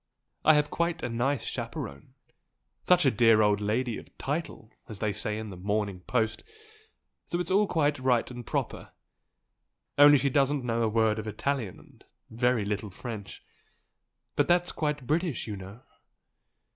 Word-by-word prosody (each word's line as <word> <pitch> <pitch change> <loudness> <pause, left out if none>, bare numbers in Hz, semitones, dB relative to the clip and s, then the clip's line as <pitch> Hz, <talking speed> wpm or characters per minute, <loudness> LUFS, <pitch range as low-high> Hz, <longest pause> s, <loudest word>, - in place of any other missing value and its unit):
I 155 - +6
have 150 0 +1
quite 170 -1 -1
a 120 - -1
nice 120 +3 0
chaperone 70 0 -6 0.7
such 180 -3 +4
a 135 - +5
dear 115 -2 +5
old 105 -1 +3
English 105 - -3
lady 120 +2 0
'of - - -17
title' 140 -6 -4 0.2
as 110 - -6
they 105 0 -1
say 105 0 -2
in 110 -1 -6
the - - -8
'Morning 100 +1 -2
Post' 110 +4 -1 0.8
so 175 - -2
it's 180 0 -2
all 205 +2 +4
quite 145 -5 +1
right 130 -2 +1
and 120 -1 -7
proper - - -4 1.1
only 145 0 +9
she 140 +1 0
doesn't 140 -1 +2
know 115 -1 0
a 115 - +2
word 110 0 +2
of 110 - -6
Italian 115 -2 -2
and - - -19 0.3
very 120 -1 +1
little 105 +1 -3
French. 100 0 -8 0.9
But - - +2
that's 175 0 +3
quite 150 -3 -2
British 160 +2 -1
you 105 - -5
know!" 95 +4 -10
120 Hz, 165 wpm, -28 LUFS, 105-145 Hz, 1.1 s, only